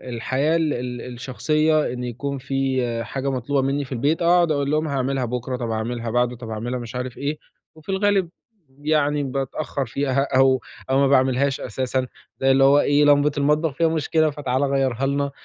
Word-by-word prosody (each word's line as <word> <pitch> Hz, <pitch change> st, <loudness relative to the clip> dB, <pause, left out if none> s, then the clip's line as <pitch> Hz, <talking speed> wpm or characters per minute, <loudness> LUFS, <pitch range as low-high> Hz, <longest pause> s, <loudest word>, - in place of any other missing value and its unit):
الحياة 135 Hz, +7 st, 0 dB
ال 160 Hz, -3 st, +1 dB
ال 125 Hz, 0 st, -4 dB
الشخصية، 155 Hz, +4 st, 0 dB
إن 125 Hz, 0 st, -5 dB
يكون 135 Hz, +4 st, -4 dB
في 130 Hz, -3 st, -1 dB
حاجة 135 Hz, +3 st, -3 dB
مطلوبة 135 Hz, +2 st, 0 dB
منّي 140 Hz, +1 st, -1 dB
في 130 Hz, -, -17 dB
البيت، 145 Hz, +7 st, 0 dB
اقعُد 170 Hz, -1 st, +4 dB
اقول 140 Hz, -1 st, 0 dB
لهم: 155 Hz, +1 st, +1 dB
"هاعملها 135 Hz, -2 st, -1 dB
بُكرة، 125 Hz, +1 st, -3 dB
طب 120 Hz, -2 st, -4 dB
هاعملها 115 Hz, +1 st, -3 dB
بعده، 125 Hz, +1 st, +1 dB
طب 120 Hz, -1 st, -9 dB
هاعملها" 120 Hz, +3 st, -3 dB
مش 120 Hz, +1 st, -8 dB
عارف 125 Hz, -1 st, -4 dB
إيه، 145 Hz, +2 st, -2 dB, 0.4 s
وفي 155 Hz, +2 st, -16 dB
الغالب 195 Hz, -2 st, +1 dB, 0.4 s
يعني 145 Hz, +1 st, 0 dB
باتأخر 135 Hz, +1 st, -3 dB
فيها 135 Hz, +2 st, 0 dB
أو 130 Hz, -1 st, +4 dB, 0.3 s
أو 135 Hz, -, +3 dB
ما 140 Hz, -, +4 dB
باعملهاش 135 Hz, 0 st, +2 dB
أساسًا. 130 Hz, +2 st, -2 dB, 0.3 s
زي 135 Hz, 0 st, +4 dB
اللي 135 Hz, 0 st, +4 dB
هو 140 Hz, +2 st, +6 dB
إيه، 145 Hz, 0 st, +3 dB
"لمبة 145 Hz, 0 st, +4 dB
المطبخ 150 Hz, +2 st, +1 dB
فيها 165 Hz, -, +2 dB
مشكلة، 160 Hz, 0 st, +1 dB
فتعالَ 140 Hz, -2 st, -1 dB
غيّرها 135 Hz, -2 st, 0 dB
لنا." 140 Hz, 0 st, -1 dB
135 Hz, 180 wpm, -22 LUFS, 125-145 Hz, 0.4 s, هو